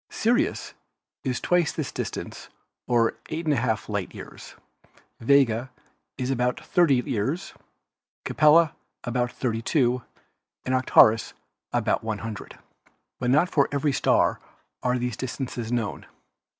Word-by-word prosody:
Sirius 260 - 0 0.5
is 130 -4 -1
twice 175 -3 +2
this 155 -4 -4
dis - - -3
tance, - - -8 0.4
or 115 -2 +2
eight 165 +2 -4
and 155 - +3
a - - 0
half 115 -3 -1
light 100 -3 -4
years; - - -11 0.6
Vega 130 -1 +3 0.5
is 130 0 -2
about 125 -1 0
30 140 -8 +2
years, 135 - -2 0.7
Capella 155 +1 +5 0.3
about 120 0 -1
32 125 +1 0 0.6
and 130 - -1
Arcturus 115 -3 +4 0.4
about - - 0
100. 110 -2 -5 0.6
But 125 - -1
not 150 +7 +4
for 145 -6 +2
every 145 0 0
star - - +2 0.4
are 125 0 +1
these 125 -2 -2
distances 125 -2 -5
known. 120 -3 -2
125 Hz, 125 wpm, -25 LUFS, 115-145 Hz, 0.7 s, Capella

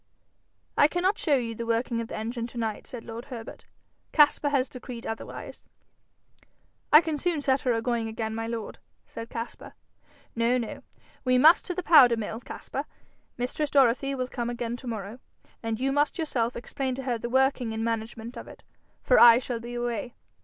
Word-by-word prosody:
'I 290 - +8
cannot 360 +5 0
show 300 -4 +3
you 235 -3 -1
the 230 +1 -6
working 230 0 0
of 230 - -5
the - - -6
engine 230 +2 -3
to 240 - -12
night,' 220 -2 -3
said 240 -3 -7
lord 230 +2 -8
Herbert. 235 -5 -9 0.5
'Caspar 295 -1 +5
has 275 -2 +1
decreed 250 -2 -9
otherwise.' 225 - -7 1.3
'I 300 - +9
can 315 -2 -2
soon 345 -1 0
set 270 -1 +1
her 250 - +1
agoing 230 0 -1
again, 220 0 -4
my 225 0 -3
lord,' 230 -2 -5 0.3
said 230 0 -8
Caspar. 230 0 -7 0.6
'No, 235 +2 +2
no. 235 -3 -5 0.4
We 255 -1 +3
must 315 +7 +6
to 360 - -4
the 365 - -3
powder 255 -9 +7
mill, 220 +1 -4
Caspar. - - -6 0.5
Mistress 255 +5 -2
Dorothy 275 0 +3
will 255 -1 -2
come 240 -2 -3
again 240 -1 -3
to 250 - -11
morrow, 220 +1 -5 0.4
and 225 -1 -3
you 270 +1 +1
must 290 +4 +1
yourself 250 -8 -1
explain 260 +1 -3
to 270 - -6
her 245 -3 -1
the 235 - -4
working 265 -2 +2
and 220 0 -3
management 230 +1 -4
of - - -8
it, - - -13 0.4
for - - +5
I 235 -1 +9
shall 245 -1 -3
be 240 +1 -7
away. 240 0 -3
240 Hz, 185 wpm, -27 LUFS, 230-270 Hz, 1.3 s, I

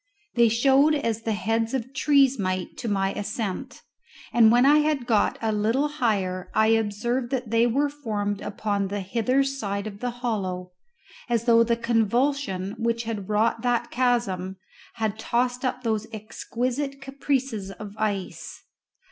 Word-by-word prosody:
They 235 -1 +5
showed 275 +6 +4
as 230 -6 -1
the 225 - -2
heads 225 +4 0
of 260 +1 -4
trees 275 -3 +3
might 185 -1 -2
to - - -5
my 195 -2 0
ascent, 205 -1 -4 0.5
and 225 -2 +6
when 245 +2 +5
I 295 +2 +6
had 300 -4 0
got 220 -4 +2
a 220 - +1
little 225 +7 +1
higher 200 -10 -1
I 220 0 +4
observed 225 +3 0
that 250 -4 -3
they 230 +1 +4
were 275 +5 +2
formed 210 -8 -3
upon 205 -1 -2
the 200 +1 -3
hither 235 +7 +1
side 215 -7 -3
of 200 -2 -7
the 245 - -2
hollow, 200 -7 -3 0.6
as 235 -2 +1
though 230 -1 +6
the 230 0 +1
convulsion 235 -3 0
which 230 0 0
had 215 -4 -5
wrought 220 +2 +1
that 245 -1 0
chasm 235 -7 0 0.4
had 220 -2 -2
tossed 245 +2 0
up 255 0 -2
those 220 -2 -1
exquisite 250 +5 -3
caprices 270 -6 -2
of 200 +2 -9
ice. 205 -3 -3
230 Hz, 155 wpm, -25 LUFS, 205-250 Hz, 0.6 s, and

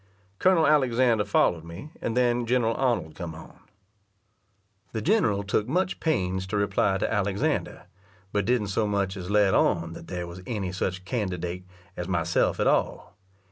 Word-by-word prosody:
Colonel 185 -4 +4
Alexander 125 -6 +3
followed 90 -4 +2
me, 85 - -9
and 115 - -2
then 120 -1 +2
General 120 -2 +2
Arnold 115 -12 0
come 85 -2 -7
on. 80 - -13 1.3
The 110 - -2
general 150 - +2
took 105 +2 0
much 185 +7 0
pains 95 - -1
to 105 +2 -2
reply 100 -1 +1
to 95 - -1
Alexander, 100 -1 -1 0.5
but 105 - 0
didn't 120 -4 +1
so 105 +2 0
much 100 -2 -1
as 90 -1 -7
let 105 -2 +3
on 85 -1 +2
that - - -10
there 90 -1 -4
was 85 +1 -9
any 100 -6 -3
such 95 0 -3
candidate 90 -5 -3 0.3
as 90 - -5
myself 85 -2 +1
at - - +2
all. - - 0
100 Hz, 160 wpm, -26 LUFS, 90-120 Hz, 1.3 s, Colonel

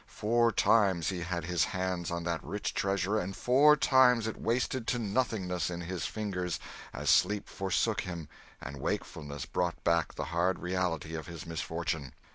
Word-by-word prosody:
Four 115 +2 +2
times 95 -9 +3
he 95 -2 -3
had 85 -1 -3
his 90 -2 +1
hands 95 -3 -2
on 85 0 -3
that 85 -1 -2
rich 105 - -3
treasure 100 +2 0
and 95 0 -4
four 140 +5 +5
times 125 -4 +5
it 110 - -4
wasted 120 +1 0
to 125 - +1
nothingness 100 -6 -1
in 85 -1 -4
his 85 +1 -3
fingers 90 -5 -3 0.3
as - - -6
sleep 105 +2 +3
forsook 95 -1 0
him 85 -4 -6 0.3
and 70 0 -8
wakefulness 70 -2 -4
brought 90 -1 -2
back 85 -1 +1
the - - -3
hard 90 +2 +2
reality 90 -3 -2
of 80 -1 -5
his 85 -3 -8
misfortune. 80 -3 -3
90 Hz, 165 wpm, -31 LUFS, 85-105 Hz, 0.3 s, four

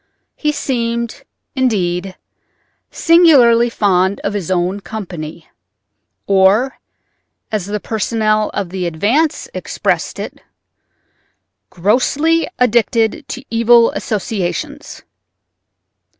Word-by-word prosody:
He 300 - 0
seemed, 235 -5 -3 0.3
indeed, 190 -7 -1 0.7
singularly 270 -9 +5
fond 190 -3 +1
of 200 - -2
his 195 -5 -4
own 185 +2 0
company—or, 175 -7 -8 2.0
as 210 -4 -2
the 210 +1 -3
personnel 215 0 0
of 200 -3 -3
the 185 -2 -2
Advance 225 - 0
expressed - - -2
it, - - -7 1.3
"grossly 275 - +1
addicted 235 +1 +1
to 260 +2 -7
evil 230 0 +5
associations." 195 -5 -4
220 Hz, 80 wpm, -16 LUFS, 190-240 Hz, 2.0 s, singularly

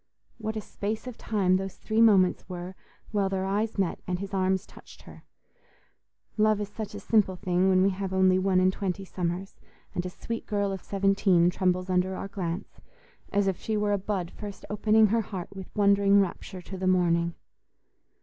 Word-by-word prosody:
What 220 0 -3
a 215 - -2
space 215 +2 -4
of 250 -2 -6
time 190 -5 +1
those 195 0 -5
three 220 +1 0
moments 195 -5 +4
were 180 0 -6 0.4
while 200 -3 +1
their 190 0 -1
eyes 210 +3 -1
met 190 -4 0
and 180 -1 -1
his 195 +1 -7
arms 190 0 +1
touched - - -16
her! - - -14 1.1
Love 215 -1 +3
is 205 -1 -3
such 210 0 -6
a - - -5
simple 200 -2 +2
thing 180 0 +1
when 185 0 +4
we 195 - +3
have 190 0 -4
only 190 0 +4
one 185 -1 +2
and 185 0 +3
twenty 195 0 -3
summers 180 +1 -4 0.3
and 175 - -2
a 180 - -4
sweet 230 +5 -6
girl 205 -2 0
of 190 -2 -5
seventeen 195 -3 +3
trembles 185 0 0
under 185 0 +1
our 195 - -5
glance, 185 -1 -5 0.5
as 200 0 +2
if 190 -3 0
she 220 -1 -1
were 210 0 +1
a 200 - +1
bud 190 -3 -3
first 205 -2 -9
opening 215 +1 +4
her 225 +2 +2
heart 190 -3 -7
with 190 -1 -8
wondering 200 -1 +4
rapture 185 -1 -3
to 190 +1 -8
the 185 - -1
morning. 170 -2 +2
195 Hz, 190 wpm, -27 LUFS, 185-205 Hz, 1.1 s, moments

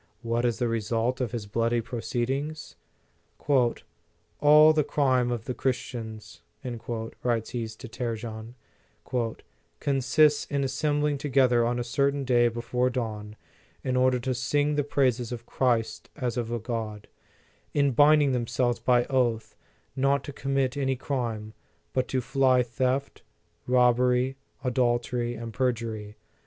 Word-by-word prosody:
What 115 +1 0
is 120 -2 +1
the 120 - 0
result 115 +3 -1
of 120 -4 -1
his 115 -4 -4
bloody 115 +3 0
proceedings? 130 +6 -3 1.6
"All 150 +1 +7
the 155 -1 +2
crime 130 -4 +1
of 120 -2 -3
the 125 - -3
Chris 130 0 0
tians," 110 -3 -8 0.8
writes 115 -2 -1
he 120 -2 -3
to 110 +4 -10
Trajan, 115 -1 -5 0.6
" 110 -7 -5
consists 145 +2 +3
in 140 -1 -1
as 135 -1 -2
sembling 145 0 0
together 130 -4 +3
on 120 +1 0
a 120 - -1
certain 140 +2 0
day 120 -1 +4
before 120 +2 -1
dawn, 110 -4 -4 0.5
in 130 -1 -1
order 130 0 +3
to 130 +1 -1
sing 145 +5 0
the 145 0 +1
praises 125 -4 0
of 120 -1 -6
Christ 120 -4 0
as 125 -6 -2
of 120 -2 -3
a 120 - 0
God; 110 -2 -5 0.7
in 140 -1 +3
binding 145 +2 +5
themselves 120 0 0
by 120 -1 +3
oath 120 -4 0 0.4
not 140 +1 +2
to 145 - -7
commit 135 -1 -1
any 135 -2 0
crime, 115 -5 -3 0.4
but 130 - 0
to 130 - -1
fly 130 0 +3
theft, 130 +3 -2 0.5
rob 125 -1 +4
bery, 125 +1 +2 0.3
adultery 120 -1 0
and 115 0 -7
perjury. 115 -4 -2
125 Hz, 140 wpm, -27 LUFS, 115-135 Hz, 1.6 s, All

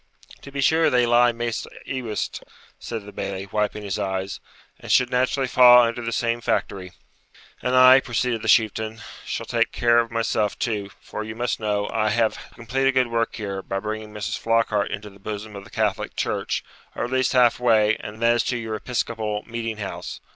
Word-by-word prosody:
'To 140 - -11
be 140 0 -3
sure, 160 +4 +4
they 125 -1 +3
lie 120 +1 +5
maist 120 -1 -3 0.2
ewest,' 120 -5 -4 0.4
said 115 -3 -6
the 105 - -10
Bailie, 95 -1 -5
wiping 105 0 -1
his 100 0 -3
eyes, 95 -1 -3 0.4
'and - - -6
should 125 -1 +4
naturally 130 +2 +1
fa' 125 - -1 0.2
under 115 0 0
the 115 0 -3
same 120 0 -1
factory.' 95 -5 -2 0.7
'And 125 0 0
I,' 130 +1 +8
proceeded 120 -2 -1
the 115 - -5
Chieftain,'shall 110 0 0
take - - 0
care 120 0 +3
of 115 0 0
myself, 115 -2 -1
too; 105 -4 -2
for 110 - -6
you 110 0 -7
must 120 +1 -2
know, 105 -2 -1
I 110 -1 +1
have 110 +1 +2
to - - -13
complete 130 +4 -1
a - - +5
good 130 -2 +2
work 115 0 -1
here, 100 -3 -4
by 95 - -4
bringing 110 +1 -5
Mrs. 105 +1 -4
Flockhart 115 -3 +1
into 105 0 -6
the 100 - -18
bosom 105 +1 -6
of 100 0 -9
the - - -14
Catholic 105 -3 -1
church, - - -2 0.3
or - - -2
at 120 - -7
least 130 +1 +1
half 125 -2 +4
way, 110 -3 +4
and 105 +1 -8
that 120 0 +4
is 120 - +1
to 125 - -1
your 110 -2 -5
Episcopal 110 -2 -3
meeting 115 -2 -4
house. 100 -2 -6
115 Hz, 195 wpm, -23 LUFS, 105-120 Hz, 0.7 s, I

